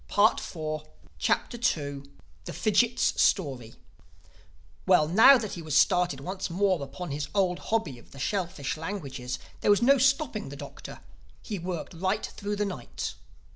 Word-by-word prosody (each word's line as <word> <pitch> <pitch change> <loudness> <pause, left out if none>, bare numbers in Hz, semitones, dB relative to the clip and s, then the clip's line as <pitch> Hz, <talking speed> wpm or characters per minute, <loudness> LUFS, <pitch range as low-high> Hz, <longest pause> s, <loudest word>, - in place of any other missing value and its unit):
THE 210 +3 +4
SECOND 155 -2 -5 0.3
CHAPTER 145 - 0 0.4
THE - - -6
FIDGIT'S 235 +2 +2
STORY 130 - +1 1.1
WELL, 150 - +5
now 225 - +8
that 215 -4 -4
he 175 - -6
was 155 -3 0
started 175 -6 +3
once 185 +5 -4
more 185 -1 +1
upon 140 +4 -7
his 145 +1 -3
old 185 -3 +2
hobby 180 - -1
of - - -19
the 140 - -14
shellfish 170 -1 -2
languages, 140 -8 -5 0.2
there - - 0
was 205 +3 +5
no 275 +2 +5
stopping 275 +4 +1
the - - -8
Doctor. - - -10 0.4
He 205 -4 -4
worked 175 -1 -5
right 190 +5 -1
through 205 0 -4
the 210 0 0
night. 180 -12 -5
180 Hz, 150 wpm, -28 LUFS, 150-205 Hz, 1.1 s, now